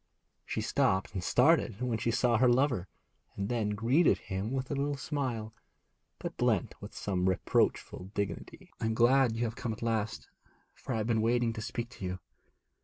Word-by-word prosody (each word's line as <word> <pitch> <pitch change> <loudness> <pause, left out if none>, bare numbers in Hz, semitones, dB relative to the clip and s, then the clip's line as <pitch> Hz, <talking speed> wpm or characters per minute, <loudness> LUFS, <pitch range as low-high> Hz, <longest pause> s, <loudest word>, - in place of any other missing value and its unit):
She - - -2
stopped 95 0 +1
and 95 -3 -3
started 125 - +3
when 125 -3 -1
she 115 - 0
saw 120 0 +3
her 125 +2 +5
lover, 125 -7 +2 0.5
and 100 +2 -3
then 110 -4 0
greeted 125 +10 +3
him 95 +3 -4
with 135 +1 -2
a - - +1
little 140 +1 -1
smile, 130 -7 -3 0.6
but - - -5
blent - - +1
with - - -9
some 95 -2 0
reproachful 95 0 0
dignity. 100 -4 -4
'I - - -2
am 110 - +1
glad 120 0 +4
you 115 - -1
have 115 -1 -2
come 120 -3 -3
at 110 - -8
last, 115 -1 -1 0.5
for - - -6
I - - 0
have 110 - -1
been 115 -1 +1
wanting 120 0 +2
to 110 - -6
speak 120 +2 -4
to 115 -7 -8
you. 90 0 -3
115 Hz, 185 wpm, -31 LUFS, 105-125 Hz, 0.6 s, her